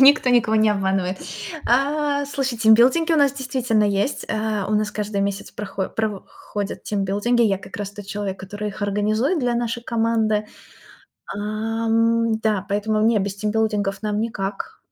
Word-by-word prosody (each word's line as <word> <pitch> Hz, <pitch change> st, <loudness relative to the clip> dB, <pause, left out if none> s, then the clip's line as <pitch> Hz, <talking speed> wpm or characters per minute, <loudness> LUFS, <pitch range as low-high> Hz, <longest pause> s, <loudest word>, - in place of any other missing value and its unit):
Никто 270 Hz, -1 st, +7 dB
никого 230 Hz, -3 st, +3 dB
не 215 Hz, 0 st, +4 dB
обманывает. 190 Hz, -2 st, 0 dB, 0.5 s
А, 285 Hz, +3 st, +1 dB
слушай, 270 Hz, -4 st, -2 dB
тимбилдинги 245 Hz, +9 st, +5 dB
у -, -, +4 dB
нас 285 Hz, -3 st, +4 dB
действительно 255 Hz, -5 st, 0 dB
есть. 205 Hz, +6 st, 0 dB
Э, 215 Hz, -2 st, -1 dB
у -, -, -1 dB
нас 210 Hz, 0 st, +1 dB
каждый 210 Hz, -1 st, -2 dB
месяц 200 Hz, 0 st, -3 dB
прохо 195 Hz, -2 st, -4 dB
прово 215 Hz, -3 st, -2 dB
ходят 205 Hz, -1 st, -6 dB
тимбилдинги. 205 Hz, +4 st, +1 dB
Я 200 Hz, -4 st, +3 dB
как -, -, -10 dB
раз 205 Hz, -1 st, -4 dB
тот 205 Hz, -1 st, -10 dB
человек, 200 Hz, -1 st, -4 dB
который 205 Hz, +2 st, -5 dB
их 205 Hz, +1 st, -7 dB
организует 215 Hz, -, +1 dB
для 245 Hz, -4 st, 0 dB
нашей 235 Hz, 0 st, -2 dB
команды. 225 Hz, -3 st, +1 dB, 0.8 s
А, 200 Hz, -, -6 dB, 0.5 s
м, 230 Hz, 0 st, +2 dB
да, 210 Hz, -3 st, 0 dB
поэтому, 215 Hz, +1 st, 0 dB
не, 225 Hz, -2 st, +4 dB
без 195 Hz, 0 st, -2 dB
тимбилдингов 210 Hz, -1 st, 0 dB
нам 210 Hz, -1 st, -1 dB
никак. 200 Hz, -3 st, -4 dB
215 Hz, 160 wpm, -22 LUFS, 205-235 Hz, 0.8 s, Никто